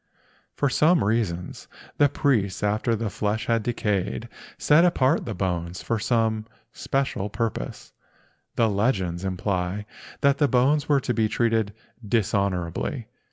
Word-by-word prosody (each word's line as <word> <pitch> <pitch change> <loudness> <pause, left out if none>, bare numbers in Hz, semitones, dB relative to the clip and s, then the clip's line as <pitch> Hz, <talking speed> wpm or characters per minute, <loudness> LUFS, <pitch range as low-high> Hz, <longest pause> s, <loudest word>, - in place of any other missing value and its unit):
For 145 - +1
some 155 - +3
reason 100 -5 -1 0.5
the 145 -1 +5
priests, 110 - 0
after 105 +3 +1
the 110 -2 -3
flesh 105 +2 -1
had 115 -1 +1
decayed, 105 -1 -2 0.3
set 150 +3 +5
apart 140 -7 +2
the 110 - -4
bones 90 -1 -3
for 115 -2 -1
some 110 -1 0 0.3
special 135 -7 -2
purpose. 115 0 -4 0.6
The 115 - +3
legends 100 -5 0
imply 95 +1 -2 0.4
that 140 0 +3
the 145 - +4
bones 135 +5 +2
were 140 -2 +4
to 125 - -1
be 110 -2 +1
treated 110 -2 +1 0.3
dishonorably. 100 -5 -1
110 Hz, 130 wpm, -25 LUFS, 100-125 Hz, 0.6 s, the